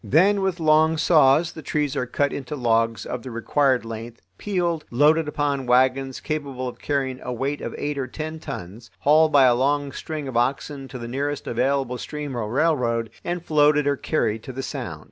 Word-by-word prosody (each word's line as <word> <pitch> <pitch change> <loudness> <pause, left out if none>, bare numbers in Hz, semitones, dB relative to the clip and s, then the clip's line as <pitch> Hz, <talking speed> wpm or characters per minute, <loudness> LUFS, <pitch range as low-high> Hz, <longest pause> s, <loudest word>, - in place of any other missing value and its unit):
Then 185 - +3
with 190 -2 -1
long 160 0 +4
saws 155 0 +4
the 160 - -9
trees 150 -2 -1
are 125 - -1
cut 140 +3 0
into 140 +2 -5
logs 115 -4 +1
of 125 - -4
the 130 - -8
required 125 +2 +1
length, 115 +1 -7 0.2
peeled, 175 -5 -1
loaded 150 +5 +3
upon 145 -3 -1
wagons 130 +1 +2
capable 140 -5 -4
of 125 - -8
carrying 135 -3 -2
a 125 - -5
weight 135 +4 -2
of - - -5
eight 145 -1 -3
or 130 - -2
ten 155 +4 -6
tons, 105 - -8
hauled 155 +2 +5
by 140 -2 +6
a 125 -2 +6
long 140 +3 +1
string 155 -1 -5
of 130 - -6
oxen 135 +3 -1
to 130 - -8
the 120 -1 -6
nearest 140 +3 -3
available 130 0 0
stream 150 -3 -5
or 110 -3 -3
railroad, 125 -6 +1
and 175 0 -3
floated 150 -1 +3
or 145 0 +2
carried 115 -7 -1
to 130 - -8
the 135 +1 -5
Sound. - - -5
140 Hz, 195 wpm, -23 LUFS, 125-150 Hz, 0.2 s, by